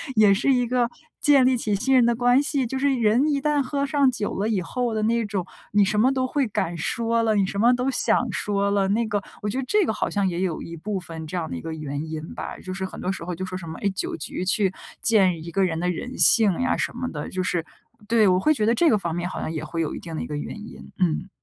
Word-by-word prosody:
也 210 -2 +6
是 255 +7 +2
一 245 -1 +2
个 240 0 +1 0.3
建 280 -3 +5
立 260 - +4
起 210 -3 -1
信 245 +7 +1
任 250 -2 +6
的 235 0 +2
关 245 +2 +4
系， 285 -3 0
就 265 +3 -3
是 275 -1 +2
人 235 +4 +3
一 285 -2 +1
旦 295 0 +2
喝 280 +1 -1
上 280 -1 +3
酒 210 -4 -3
了 210 +3 0
以 200 -4 +1
后 240 +6 -2
的 215 -1 -1
那 230 +1 +2
种， 195 -3 -3 0.3
你 205 -1 +4
什 210 +1 0
么 255 +4 +4
都 260 -1 0
会 275 -1 0
敢 175 -4 -2
说 230 +7 0
了， 220 -1 +2
你 200 -2 +3
什 200 +1 -4
么 240 +3 +5
都 250 +2 0
想 250 - +1
说 200 -1 0
了。 200 -1 +2
那 225 +4 +1
个， 205 -1 -1 0.2
我 210 - -2
觉 255 - -3
得 - - -2
这 420 -3 +3
个 - - 0
好 - - -1
像 200 -2 0
也 175 -1 -2
有 180 -4 -1
一 165 - -7
部 195 +4 -3
分， 165 -2 -8
这 180 +3 -4
样 160 -2 -3
的 - - -4
一 - - -6
个 165 -1 -5
原 150 0 -5
因 160 0 -6
吧， - - -6
就 185 - -7
是 190 0 -3
很 - - -8
多 185 - -1
时 195 - -6
候 175 0 -4
就 185 +2 -4
说 185 0 -5
什 170 - -9
么， 160 - -7
哎， 205 - +1
酒 - - -3
局 165 - -4
去 195 0 +2 0.3
见 185 -7 +3
一 170 - -7
个 195 +3 +1
人 165 -3 -2
的 180 +1 0
人 175 - -6
性 200 +6 +5
呀 - - +1
什 - - -2
么 255 +1 -3
的， 150 -1 -6
就 185 - -2
是 170 -3 -1 0.4
对， 225 -2 +4
我 185 -1 +4
会 305 +11 +3
觉 215 -8 0
得 230 +2 +3
这 325 +7 +4
个 215 - +4
方 170 -4 -3
面， 175 +1 -2
好 - - -5
像 - - -3
也 160 - -4
会 165 -1 -3
有 155 - -2
一 - - -6
定 165 -1 -7
的 - - -3
一 - - -6
个 150 - -4
原 215 +8 -6
因， - - -12
嗯。 180 +1 0
205 Hz, 315 characters per minute, -24 LUFS, 180-245 Hz, 0.4 s, 也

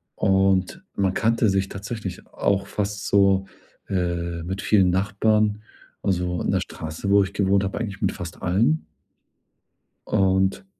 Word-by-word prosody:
Und 95 - +2
man 95 -1 +1
kannte 115 0 +2
sich 95 0 +1
tatsächlich 100 -1 -6
auch 100 0 0
fast 105 0 -3
so, 100 -1 +4 0.4
äh, 85 -2 -2
mit 95 +3 -4
vielen 95 -3 +4
Nachbarn, 105 +2 +1 0.4
also, 90 -2 0
in - - 0
der - - +1
Straße, 80 +5 -6
wo 100 0 +6
ich 95 +1 -6
gewohnt 100 0 +2
habe, 95 - -3
eigentlich 100 -3 -5
mit - - +2
fast 85 0 -8
allen. 115 - +2 1.2
Und, 95 - +2
95 Hz, 140 wpm, -24 LUFS, 95-100 Hz, 1.2 s, wo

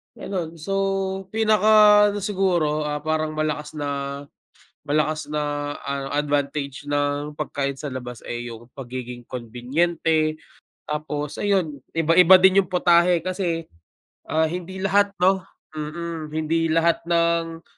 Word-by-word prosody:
ganon. 170 -4 -4
So 195 +1 -1
pinaka 215 -1 +6
ano 205 - -4
siguro, 175 -7 +1
ah, 150 0 -3
parang 155 0 -1
malakas 150 0 -3
na 140 -1 -4 0.6
malakas 150 0 -1
na 145 -1 -2
ah, 140 0 -4
a 145 - +1
advantage 145 -1 -2
ng 145 +1 -1
pagkain 140 -2 -3
sa 150 - -5
labas 125 -2 -7
ay 120 0 -4
yung 115 +1 -11
pagiging 125 -1 -7
konbinyente. 155 +6 0 0.5
Tapos 150 -1 -3
ayun 180 -9 0
iba-iba 165 +3 +6
din 190 +1 +5
yung 185 - -17
putahe 175 -1 +4
kasi, 175 -3 -2 0.6
ah, 160 0 +2
hindi 180 +3 -5
lahat 200 +1 +3
no 190 +1 +3 0.3
mm, 155 +1 -5
hindi 160 +1 0
lahat 165 +1 +2
ng 170 -1 +1
155 Hz, 125 wpm, -23 LUFS, 145-180 Hz, 0.6 s, pinaka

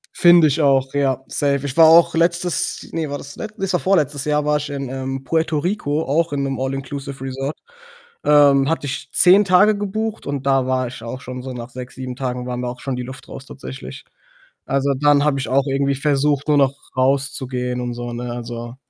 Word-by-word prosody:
Finde 175 -2 +6
ich 150 +3 0
auch, 135 -2 +2
ja, 135 -2 0
safe. 140 -1 -1
Ich 135 -2 -4
war 165 -1 +8
auch 170 +1 +6
letztes 170 +1 0
ne, 160 -2 -2
war 145 - -3
das 140 0 -10
le 220 - -5
ne, - - -19
es 190 - -3
war 180 - +2
vorletztes 150 -7 +1
Jahr, 150 0 +1
war 150 0 +2
ich 150 0 -5
in, 140 -1 -4
ähm, 135 0 -4
Puerto 160 +1 0
Rico, 155 -2 -1
auch 165 +4 0
in 140 -1 -1
'nem 135 -1 -3
All-inclusive-Resort. 135 +1 -4 0.7
Ähm, 145 -2 +5
hatte 165 -2 -1
ich 140 +2 -5
10 190 +3 +6
Tage 200 +3 +4
gebucht 215 +1 -4
und 140 -1 -3
da 135 -2 +2
war 130 -1 0
ich 120 -1 -9
auch 115 +3 -6
schon 125 -1 -7
so 130 +1 -7
nach 120 -1 -7
6, 125 0 -9
7 130 -1 -6
Tagen 125 -2 -4
war 125 0 -4
mir 125 0 -3
auch 120 +1 -6
schon 135 -2 -3
die 125 - -4
Luft 130 +1 -9
raus 135 - -10
tatsächlich. 135 -1 -9 0.6
Also, 140 +1 0
dann 145 +1 +3
habe 140 -2 +1
ich 135 - -4
auch 135 +1 +2
irgendwie 140 0 0
versucht, 145 0 0
nur 150 -1 +3
noch 135 -1 +3 0.2
rauszugehen 130 -2 -1
und 120 0 -3
so, 120 0 -5
ne? 120 0 -5
Also 120 0 -7
140 Hz, 215 wpm, -20 LUFS, 130-150 Hz, 0.7 s, war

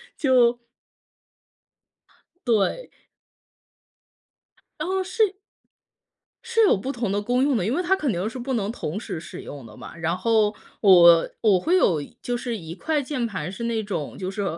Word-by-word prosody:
就 245 -4 +3 1.9
对。 235 - +1 1.9
哦， 375 +5 -1
是 395 +1 +1 1.1
是 470 -1 +1
有 380 - +4
不 260 +8 -4
同 235 -6 -3
的 205 +1 0
功 245 +5 +1
用 275 -3 +2
的， 180 - -1
因 225 - 0
为 355 - 0
它 370 +2 +2
肯 300 -9 -1
定 185 +2 -2
是 255 - -8
不 260 +2 -3
能 215 -3 -1
同 200 -5 -4
时 195 - -6
使 165 - -9
用 140 -4 -9
的 - - -13
嘛。 - - -11
然 170 0 -1
后 215 0 +2 0.3
我 170 -4 +7
我 205 -5 +4
会 340 - +1
有 170 - +2 0.2
就 245 - -2
是 240 -2 -4
1 165 -3 -8
块 310 +7 -1
键 260 -3 -3
盘， 185 -6 -4
是 215 +5 -7
那 230 -2 -1
种 185 -8 -5
就 185 -1 -4
是 200 +1 -4
230 Hz, 175 characters per minute, -24 LUFS, 190-270 Hz, 1.9 s, 我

